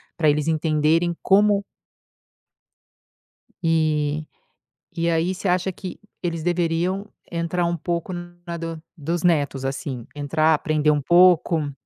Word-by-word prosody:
para 155 -3 +3
eles 150 +1 +1
entenderem 160 +2 +2
como 205 +1 +4 2.0
E, 155 -2 +1 0.7
e 170 0 0
aí 165 +2 +1
você 190 +2 -4
acha 180 +1 +1
que 185 0 -8 0.2
eles 165 -2 -3
deveriam 175 +3 0 0.3
entrar 170 +1 -1
um 170 0 -1
pouco 170 +2 -3
na 175 0 -7
do 165 -1 -5 0.2
dos 165 +3 -2
netos 145 -6 +1
assim, 135 -3 -4
entrar, 155 +2 +2
aprender 150 0 +2
um 145 - +1
pouco? 170 -2 +4
165 Hz, 120 wpm, -23 LUFS, 155-175 Hz, 2.0 s, como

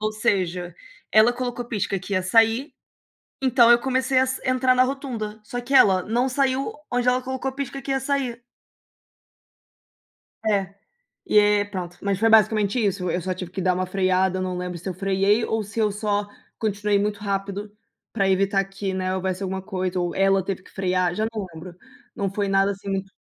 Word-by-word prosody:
Ou 215 0 0
seja, 180 -4 -1 0.4
ela 220 +3 +6
colocou 245 0 -4
pisca 205 -3 -2
que 200 +2 -4
ia 185 - +1
sair, 225 - +3 0.7
então 245 -2 +5
eu 240 - +6
comecei 260 0 +1
ass 260 0 0
entrar 255 0 +3
na 255 - +5
rotunda, 250 -6 -4
só 245 +3 -5
que 265 +3 -5
ela 190 -8 +6
não 245 +4 0
saiu 270 +6 0 0.2
onde 245 0 0
ela 250 +1 +1
colocou 260 +1 -3
pisca 275 0 -5
que 270 - -4
ia 270 - +1
sair. 265 -3 -2 2.0
É, 200 -2 0 0.5
e - - 0
é, 205 0 +4
pronto. 180 -4 -7
Mas 200 -1 -1
foi 225 - +4
basicamente 215 +1 +4
isso, 180 -3 -1
eu 180 - -1
só 185 +1 -3
tive 180 -1 -7
que 190 +1 -5
dar 185 0 +2
uma 185 0 -1
freada, 185 0 +1
eu 185 - -2
não 185 -1 -3
lembro 180 -1 -4
se 180 - -7
eu 185 - -3
freei 195 +4 +1
ou 220 -1 -1
se 205 +3 -5
eu 210 -1 +2
só 205 0 -1 0.3
continuei 205 -1 0
muito 205 0 -1
rápido 200 0 -3 0.4
para 195 -1 +1
evitar 195 +1 +2
que, 195 0 -5
né, 185 0 -1
houvesse 185 +1 -2
alguma 190 0 -3
coisa 185 -2 -3
ou 175 -1 -1
ela 195 -1 +3
teve 190 -1 -4
que - - -18
frear. 185 -2 0
Já 215 +3 0
não 210 - -3
lembro, 170 +2 -10 0.4
não 200 -1 -2
foi 200 0 -1
nada 195 0 +2
assim 200 0 -7
muito 195 0 -3
205 Hz, 195 wpm, -23 LUFS, 190-235 Hz, 2.0 s, ela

